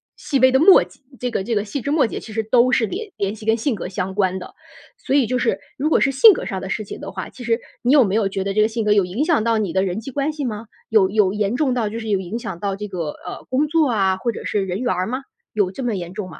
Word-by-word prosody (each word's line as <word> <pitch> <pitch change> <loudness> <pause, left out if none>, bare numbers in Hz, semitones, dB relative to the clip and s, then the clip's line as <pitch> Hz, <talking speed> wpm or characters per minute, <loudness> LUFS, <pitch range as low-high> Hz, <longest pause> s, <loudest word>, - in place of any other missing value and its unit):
细 275 - -1
微 260 +1 +6
的 265 - +5
末 370 +4 +8
节 - - -21 0.2
这 250 - -2
个 190 - -1
这 230 - -2
个 205 -1 0
细 245 +6 -4
枝 280 - -3
末 290 -6 +3
节 - - -5
其 220 - -10
实 225 +1 -1
都 250 +1 +4
是 230 - +3
联 400 - -6
联 200 +2 -2
系 215 - -12
跟 225 +1 +3
性 235 +2 -1
格 180 - -6
相 190 0 -4
关 190 -2 +1
的。 180 - -10 0.4
所 - - -3
以 270 -5 +3
就 250 +2 0
是 240 - 0 0.2
如 295 +3 0
果 - - +3
是 270 - +2
性 430 - +8
格 - - -5
上 190 -1 -4
的 190 - -6
事 215 +2 -3
情 - - -8
的 - - -6
话， 185 -1 -5
其 255 - -11
实 235 0 +1 0.2
你 245 - +2
有 290 -3 +7
没 195 0 -1
有 215 -3 +2
觉 195 0 -3
得 195 - -1
这 215 - +3
个 215 - +4
性 225 -1 -2
格 210 - +4
有 205 -2 +4
影 205 +12 -2
响 315 -9 +2
到 230 -1 +2
你 200 -6 -1
的 190 0 +2
人 190 +2 -2
际 260 +4 -8
关 285 +3 -1
系 295 -3 -4
吗？ 220 -1 -5 0.2
有 205 -4 +4
有 200 -2 +2
严 210 +2 -1
重 275 -5 +1
到 230 -4 0
就 225 +2 -5
是 220 - -7
有 200 -3 +1
影 190 +6 -5
响 180 -7 -6
到 200 -1 -1
这 210 +1 -5
个， 170 -6 -4 0.2
呃， - - -7
工 280 +4 +1
作 310 -2 +2
啊， 195 -4 +2
或 235 +5 -1
者 - - -8
是 200 -2 0
人 185 +1 -3
缘 250 0 0
儿 185 +2 -1
吗？ 255 +3 -4 0.3
有 200 -4 +1
这 265 - -5
么 240 - 0
严 175 -1 -6
重 200 -2 -5
吗？ 160 - -12
220 Hz, 345 characters per minute, -21 LUFS, 195-255 Hz, 0.4 s, 末